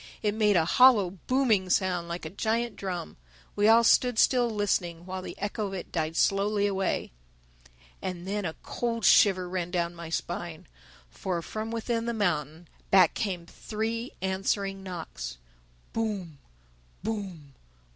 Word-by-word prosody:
It 210 Hz, -1 st, +2 dB
made 210 Hz, -2 st, +3 dB
a 165 Hz, -2 st, +4 dB
hollow 215 Hz, -2 st, +6 dB, 0.2 s
booming 230 Hz, -8 st, +2 dB
sound, 180 Hz, -2 st, +1 dB
like 170 Hz, 0 st, -5 dB
a 155 Hz, -, -5 dB
giant 230 Hz, +4 st, -1 dB
drum. 180 Hz, -, -5 dB, 0.4 s
We 205 Hz, +1 st, +3 dB
all 230 Hz, +1 st, +7 dB
stood 245 Hz, +1 st, +4 dB
still 245 Hz, 0 st, +4 dB
listening 180 Hz, -5 st, -1 dB
while 185 Hz, 0 st, -5 dB
the -, -, -8 dB
echo 205 Hz, +1 st, -2 dB
of 195 Hz, -, -7 dB
it 180 Hz, -, -7 dB
died 160 Hz, -1 st, -2 dB
slowly 200 Hz, +1 st, +2 dB
away. 195 Hz, -1 st, -1 dB, 0.9 s
And 180 Hz, -1 st, -5 dB
then 205 Hz, +1 st, -2 dB
a 160 Hz, -3 st, -3 dB
cold 230 Hz, -3 st, -2 dB
shiver 185 Hz, -3 st, +5 dB
ran 180 Hz, -1 st, -3 dB
down 175 Hz, -1 st, -1 dB
my 170 Hz, -1 st, -8 dB
spine. 170 Hz, 0 st, -4 dB, 0.5 s
For, 170 Hz, -, -3 dB
from 220 Hz, +4 st, -5 dB
within 230 Hz, 0 st, -2 dB
the 235 Hz, -, -1 dB
mountain, 165 Hz, -5 st, -1 dB, 0.2 s
back 185 Hz, -4 st, +6 dB
came 185 Hz, -5 st, -3 dB
three 225 Hz, +6 st, -4 dB
answering 195 Hz, +1 st, -1 dB
knocks: 160 Hz, -, -6 dB, 0.6 s
_Boom!... 200 Hz, -9 st, -3 dB, 0.7 s
Boom!... 190 Hz, -10 st, -5 dB
195 Hz, 145 wpm, -28 LUFS, 175-220 Hz, 0.9 s, all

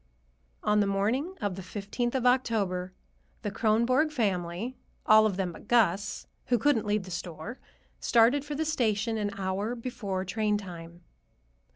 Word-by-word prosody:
On 210 Hz, 0 st, +3 dB
the 205 Hz, -, +3 dB
morning 230 Hz, -, 0 dB
of 205 Hz, -2 st, -1 dB
the 190 Hz, -, -6 dB
fifteenth 210 Hz, +6 st, -3 dB
of 255 Hz, -2 st, 0 dB
October 210 Hz, -8 st, +1 dB, 0.5 s
the 205 Hz, -, -2 dB
Kronborg 235 Hz, +9 st, +2 dB
family, 200 Hz, -, -1 dB, 0.3 s
all 215 Hz, 0 st, +7 dB
of 195 Hz, -3 st, -3 dB
them 185 Hz, -2 st, -1 dB
but 170 Hz, -, -13 dB
Gus, 205 Hz, -4 st, +2 dB, 0.2 s
who 245 Hz, -, +3 dB
couldn't 225 Hz, -3 st, +2 dB
leave 205 Hz, -1 st, +1 dB
the 185 Hz, -, -10 dB
store, 170 Hz, +6 st, -6 dB, 0.4 s
started 240 Hz, +4 st, +4 dB
for 295 Hz, 0 st, -5 dB
the 315 Hz, +2 st, -1 dB
station 225 Hz, -6 st, 0 dB
an 205 Hz, -1 st, 0 dB
hour 195 Hz, +4 st, -2 dB
before 225 Hz, -6 st, -4 dB
train 210 Hz, +2 st, 0 dB
time. 170 Hz, -3 st, -9 dB
210 Hz, 155 wpm, -29 LUFS, 190-240 Hz, 0.5 s, all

